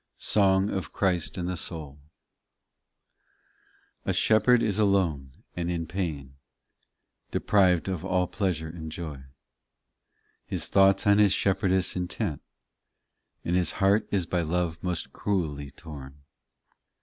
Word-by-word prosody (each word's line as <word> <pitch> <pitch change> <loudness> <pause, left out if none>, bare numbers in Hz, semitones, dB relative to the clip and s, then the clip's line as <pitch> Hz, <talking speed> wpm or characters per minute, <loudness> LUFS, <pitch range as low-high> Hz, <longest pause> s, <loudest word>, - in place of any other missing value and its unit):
SONG 95 -1 +3
OF 95 - -4
CHRIST 90 -4 0
AND 90 -1 -2
THE 90 - -2
SOUL 80 -4 -6 2.0
i - - -5
A - - +2
SHEPHERD 115 +2 +4
is 105 -1 0
alone 85 -10 0
and 85 -1 -2
in 85 -2 -2
pain, 75 -8 -4 0.9
Deprived 95 -4 +2
of 95 -4 -3
aH 90 -1 +1
pleasure 90 -4 -2
and 80 -1 -8
joy, 75 -5 -6 1.3
His - - -2
thoughts 95 -1 +4
on 100 0 +5
his 100 -2 +5
shepherdess 95 -1 +1
intent, 90 -4 -3 1.0
And 85 - 0
his 90 -1 +1
heart 100 +2 +2
is 95 -4 0
by 90 +1 -1
love 85 0 -1
most 90 -2 -3
cruelly 75 -8 -2
torn. 70 -3 -11
90 Hz, 125 wpm, -27 LUFS, 80-95 Hz, 2.0 s, on